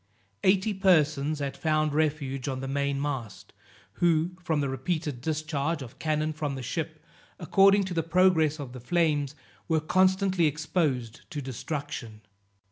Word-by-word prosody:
Eighty 195 Hz, +3 st, +3 dB
persons 155 Hz, -6 st, +3 dB
had 140 Hz, -1 st, -3 dB
found 155 Hz, -1 st, +1 dB
refuge 145 Hz, -4 st, -1 dB
on 130 Hz, -2 st, -2 dB
the 135 Hz, -, -4 dB
main 140 Hz, 0 st, -1 dB
mast, 135 Hz, -7 st, -5 dB, 0.5 s
who, 170 Hz, 0 st, +3 dB
from 160 Hz, -3 st, 0 dB
the 140 Hz, -, 0 dB
repeated 140 Hz, 0 st, -3 dB
discharge 155 Hz, 0 st, -2 dB
of 120 Hz, -, -12 dB
cannon 155 Hz, 0 st, 0 dB
from 150 Hz, -2 st, -3 dB
the 130 Hz, -, -6 dB
ship, 155 Hz, +3 st, -4 dB, 0.3 s
according 195 Hz, +3 st, +4 dB
to 185 Hz, -1 st, -4 dB
the 165 Hz, -, +1 dB
progress 165 Hz, -2 st, +3 dB
of 130 Hz, -4 st, -7 dB
the 125 Hz, -, -7 dB
flames, 150 Hz, 0 st, +1 dB, 0.3 s
were 160 Hz, -1 st, +2 dB
constantly 185 Hz, +1 st, +3 dB
exposed 145 Hz, -6 st, -1 dB
to 155 Hz, -6 st, -5 dB
destruction. 130 Hz, -4 st, -5 dB
155 Hz, 145 wpm, -28 LUFS, 140-170 Hz, 0.5 s, according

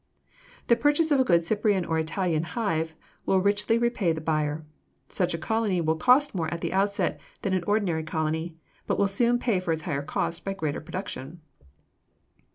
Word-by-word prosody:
The 235 Hz, -, +5 dB
purchase 290 Hz, +6 st, +2 dB
of 285 Hz, -, +4 dB
a -, -, +5 dB
good 170 Hz, -7 st, +3 dB
Cyprian 205 Hz, -1 st, +1 dB
or 160 Hz, -1 st, 0 dB
Italian 160 Hz, 0 st, 0 dB
hive 165 Hz, -3 st, -2 dB, 0.3 s
will 190 Hz, -, +4 dB
richly 205 Hz, +3 st, +2 dB
repay 235 Hz, -7 st, +1 dB
the 160 Hz, -, -2 dB
buyer. 155 Hz, -1 st, -1 dB, 0.4 s
Such 180 Hz, -2 st, 0 dB
a -, -, -3 dB
colony 205 Hz, +2 st, 0 dB
will 160 Hz, -1 st, +1 dB
cost 255 Hz, -, +4 dB
more 165 Hz, -5 st, -2 dB
at 170 Hz, -1 st, -4 dB
the -, -, -2 dB
outset 200 Hz, +1 st, +1 dB, 0.2 s
than 195 Hz, -, 0 dB
an 185 Hz, -2 st, +1 dB
ordinary 200 Hz, -6 st, +1 dB
colony, 160 Hz, +1 st, -2 dB, 0.3 s
but -, -, 0 dB
will 200 Hz, -, +3 dB
soon 235 Hz, +5 st, +2 dB
pay 230 Hz, -6 st, +1 dB
for 180 Hz, -2 st, -2 dB
its 160 Hz, -1 st, -2 dB
higher 140 Hz, -1 st, -2 dB
cost 165 Hz, +3 st, -3 dB
by 195 Hz, -, -2 dB
greater 155 Hz, -7 st, -3 dB
production. 170 Hz, -2 st, -6 dB
180 Hz, 180 wpm, -26 LUFS, 160-210 Hz, 0.4 s, The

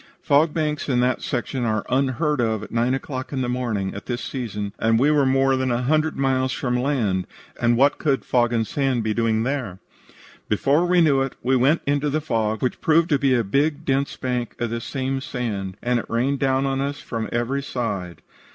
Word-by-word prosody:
Fog 150 Hz, +3 st, +4 dB
banks 150 Hz, -2 st, -2 dB
in 125 Hz, -2 st, +2 dB
that 125 Hz, 0 st, +1 dB
section 125 Hz, +1 st, -2 dB
are 110 Hz, -2 st, 0 dB
unheard 135 Hz, +2 st, +1 dB
of 110 Hz, -2 st, 0 dB
at -, -, -10 dB
nine 120 Hz, +3 st, +1 dB
o'clock 130 Hz, -1 st, -5 dB
in 135 Hz, -2 st, -2 dB
the 125 Hz, -, -1 dB
morning 120 Hz, -6 st, -2 dB
at 100 Hz, -, -9 dB
this 120 Hz, -1 st, -3 dB
season, 105 Hz, -6 st, -4 dB
and 115 Hz, 0 st, +3 dB
we 140 Hz, +6 st, +3 dB
were 145 Hz, -3 st, +3 dB
more 135 Hz, 0 st, +3 dB
than 130 Hz, 0 st, 0 dB
a 120 Hz, +1 st, 0 dB
hundred 155 Hz, +4 st, +1 dB
miles 130 Hz, -1 st, +1 dB
from 125 Hz, -2 st, -1 dB
land, 125 Hz, -8 st, 0 dB, 0.3 s
and 120 Hz, 0 st, +3 dB
what 140 Hz, +3 st, +3 dB
could 140 Hz, -4 st, 0 dB
fog 120 Hz, -2 st, +2 dB
and 115 Hz, -2 st, +1 dB
sand 135 Hz, -2 st, 0 dB
be 110 Hz, 0 st, 0 dB
doing 115 Hz, -1 st, +1 dB
there. 125 Hz, -8 st, -3 dB, 0.7 s
"Before 140 Hz, -, +2 dB
we 180 Hz, 0 st, +4 dB
knew 140 Hz, -5 st, +4 dB
it, 135 Hz, -1 st, -2 dB
we 130 Hz, +2 st, +2 dB
went 135 Hz, +6 st, +3 dB
into 145 Hz, +1 st, +1 dB
the 150 Hz, +2 st, 0 dB
fog, 110 Hz, -7 st, -1 dB
which 125 Hz, -, -1 dB
proved 160 Hz, +1 st, +3 dB
to 145 Hz, -4 st, +2 dB
be 135 Hz, -2 st, +3 dB
a 120 Hz, -, +2 dB
big 145 Hz, +8 st, 0 dB
dense 135 Hz, +1 st, 0 dB
bank 125 Hz, -3 st, -3 dB
of 120 Hz, -1 st, -2 dB
this 115 Hz, 0 st, -4 dB
same 135 Hz, 0 st, -2 dB
sand, 100 Hz, -8 st, -4 dB
and 125 Hz, 0 st, +1 dB
it -, -, -8 dB
rained 130 Hz, +4 st, 0 dB
down 135 Hz, 0 st, +1 dB
on 135 Hz, 0 st, 0 dB
us 140 Hz, +1 st, -3 dB
from 115 Hz, -2 st, -4 dB
every 120 Hz, +4 st, -1 dB
side. 105 Hz, -10 st, -4 dB
130 Hz, 215 wpm, -23 LUFS, 115-140 Hz, 0.7 s, Fog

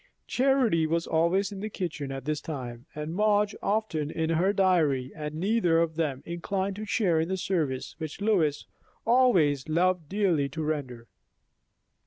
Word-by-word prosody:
Charity 250 Hz, -11 st, +2 dB
was 165 Hz, +1 st, 0 dB
always 180 Hz, +5 st, +1 dB
in 200 Hz, -, -7 dB
the 215 Hz, +2 st, -4 dB
kitchen 155 Hz, -8 st, -4 dB
at 135 Hz, -1 st, -6 dB
this 150 Hz, 0 st, -1 dB
time, 125 Hz, -6 st, -6 dB
and 150 Hz, +2 st, -4 dB
Madge 210 Hz, 0 st, +2 dB
often 200 Hz, -8 st, -1 dB
in 160 Hz, +1 st, -1 dB
her 175 Hz, +4 st, +2 dB
dairy, 160 Hz, -10 st, +2 dB
and 150 Hz, -1 st, -5 dB
neither 180 Hz, -1 st, +2 dB
of 165 Hz, -1 st, 0 dB
them 145 Hz, -5 st, -2 dB
inclined 190 Hz, +3 st, -2 dB
to 215 Hz, -, -5 dB
share 195 Hz, -7 st, +2 dB
in 160 Hz, +2 st, -1 dB
the 190 Hz, -, -1 dB
service 155 Hz, -9 st, -2 dB
which 155 Hz, +1 st, -6 dB
Lois 185 Hz, -9 st, +1 dB, 0.4 s
always 180 Hz, -, +3 dB
loved 175 Hz, -1 st, +1 dB
dearly 180 Hz, -9 st, +1 dB
to 155 Hz, +4 st, -4 dB
render. 135 Hz, -6 st, -3 dB
165 Hz, 160 wpm, -28 LUFS, 150-195 Hz, 0.4 s, always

